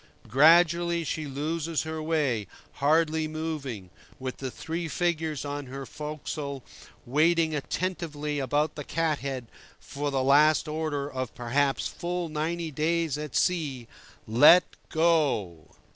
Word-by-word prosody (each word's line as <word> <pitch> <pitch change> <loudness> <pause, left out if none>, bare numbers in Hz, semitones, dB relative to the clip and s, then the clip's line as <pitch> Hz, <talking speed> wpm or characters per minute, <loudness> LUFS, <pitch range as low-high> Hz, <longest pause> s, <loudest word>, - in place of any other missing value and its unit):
Gradually 170 +5 +5
she 155 -1 -3
loses 155 +3 -2
her 160 0 -4
way, 145 - 0 0.3
hardly 155 +2 +2
moving, 150 - -5 0.3
with 130 -1 -5
the 135 - -4
three 165 +6 -4
figures 160 -1 -1
on 145 -1 -4
her 135 +1 -7
forecastle 150 -2 -5 0.4
waiting 160 +4 +2
attentively 150 -1 -3
about 145 +3 0
the 150 - -6
cat 160 -1 -1
head 135 -3 -4 0.3
for 145 +1 -4
the 135 -2 0
last 150 +4 +5
order 150 -2 -2
of, 130 -4 -5
perhaps, 135 +3 0
full 175 -1 -4
ninety 160 +2 -2
days 160 +1 0
at 150 -2 -6
sea: 145 -10 0 0.4
"Let 145 +11 +7 0.3
go!" 145 - +1
150 Hz, 125 wpm, -27 LUFS, 140-165 Hz, 0.4 s, Let